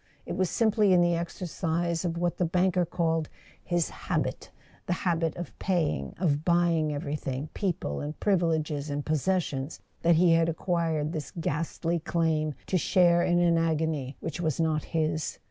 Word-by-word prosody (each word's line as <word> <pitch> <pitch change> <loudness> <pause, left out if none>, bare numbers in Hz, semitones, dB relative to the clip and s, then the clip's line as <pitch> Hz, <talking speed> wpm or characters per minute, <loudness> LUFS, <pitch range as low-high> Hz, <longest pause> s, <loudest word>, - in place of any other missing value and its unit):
It - - -4
was 185 -2 +1
simply 215 -3 +3
in 180 - +5
the 175 0 +3
exercise 170 0 -2
of 170 -2 -2
what 175 0 -1
the - - +3
banker 180 +1 +2
called 165 -3 0 0.3
his 175 -2 0
"habit"—the - - -5
habit 165 -3 0
of 175 - -7
paying, 160 - -1
of 155 -4 +1
buying 170 -3 +2
everything, 145 -1 -3
people 170 - -2
and 150 +1 -5
privileges 160 -6 +1
and 145 0 -3
posses¬ 175 +4 +1
sions—that 145 +4 -2
he 170 +1 +5
had 165 0 +3
acquired 165 -2 -1
this 155 -3 -4
ghastly 165 +2 -1
claim 160 -3 0
to 185 - +1
share 175 -1 +4
in 175 0 +2
an 170 -1 +4
agony 160 -4 -1
which 165 +1 -4
was 155 -4 -1
not 155 -2 +1
his. 155 -1 -1
165 Hz, 155 wpm, -28 LUFS, 155-175 Hz, 0.3 s, in